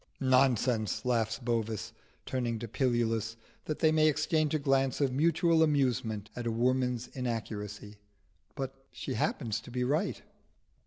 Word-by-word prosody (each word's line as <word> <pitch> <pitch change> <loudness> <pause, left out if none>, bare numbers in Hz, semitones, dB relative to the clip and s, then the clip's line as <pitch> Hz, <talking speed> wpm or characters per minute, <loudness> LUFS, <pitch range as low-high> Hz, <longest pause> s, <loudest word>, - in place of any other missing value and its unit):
"Nonsense!" 130 -4 +2
laughs 115 -2 +1
Bovis, 115 -2 -2 0.3
turning 120 -3 -1
to 115 +1 -5
Pilulus, 115 -2 0 0.3
that 155 - -2
they 160 - +4
may 155 0 +4
exchange 155 0 +1
a - - +4
glance 135 -2 +1
of 135 -3 +1
mutual 165 +3 +3
amusement 120 -8 +1
at 120 -1 -4
a - - +1
woman's 125 +1 +1
inaccuracy. 105 -4 -5 0.6
But 135 -2 -4 0.2
she - - -5
happened 110 - -1
to 110 +3 -3
be 125 0 -1
right. 140 +5 0
125 Hz, 140 wpm, -31 LUFS, 115-135 Hz, 0.6 s, they